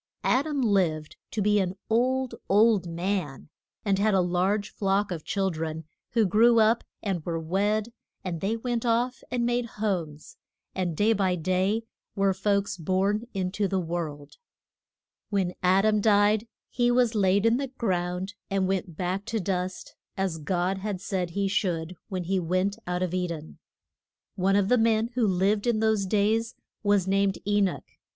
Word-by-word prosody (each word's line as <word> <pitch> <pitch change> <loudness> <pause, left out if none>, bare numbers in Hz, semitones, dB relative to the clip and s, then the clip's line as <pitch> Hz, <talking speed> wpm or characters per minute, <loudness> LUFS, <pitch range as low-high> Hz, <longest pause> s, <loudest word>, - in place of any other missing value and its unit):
Ad 270 +5 +2
am 285 -3 -1
lived 175 -8 +1
to 215 - -2
be 210 0 +3
an 185 -1 -1
old, 255 +3 +1 0.2
old 205 -2 +4
man, 170 -5 -3 0.4
and 195 -2 +2
had 210 0 +3
a - - +4
large 185 +4 0
flock 195 0 0
of 165 -3 -4
chil 195 -1 0
dren, 160 0 -4 0.3
who 225 -2 +4
grew 230 +5 +5
up 220 +2 +3 0.2
and 190 -6 -2
were 165 0 -2
wed, 205 +7 0 0.3
and 170 -3 -4
they 215 +4 0
went 240 0 -2
off 240 +1 0
and 245 -1 0
made 240 0 0
homes, 170 -8 -3 0.4
and 175 -4 -2
day 215 +2 +4
by 190 -3 +1
day 185 +6 0 0.3
were 195 -1 +2
folks 200 0 0
born 195 +6 0
in 185 -1 -1
to 200 +1 0
the 190 0 0
world. 160 -4 -5 0.9
When 190 -3 0
Ad 190 +2 +4
am 215 -1 +3
died 210 +1 +3 0.2
he 240 -1 +2
was 245 -1 +3
laid 200 0 +2
in 230 +1 +4
the 275 0 -2
ground 185 -6 -2 0.2
and 195 -1 +1
went 185 -4 -2
back 185 +2 -2
to 225 -1 -2
dust, 180 -1 -3 0.2
as 190 -4 -1
God 180 +4 -1
had 200 -1 -3
said 185 -2 -2
he 200 +3 -1
should 180 -3 -1
when 185 -3 -3
he 190 +2 0
went 185 +4 0
out 180 +1 -1
of 180 -1 -2
E 180 -1 0
den. 160 -2 -8 0.7
One 195 +1 +1
of 200 -1 +3
the 250 +2 +4
men 225 +1 +2
who 240 -3 +2
lived 200 +4 +1
in 235 -2 +2
those 220 -3 +1
days 220 +3 +1 0.3
was 205 -3 +2
named 195 0 +2
E 205 0 +2
noch. 190 -3 0
195 Hz, 175 wpm, -27 LUFS, 180-215 Hz, 0.9 s, grew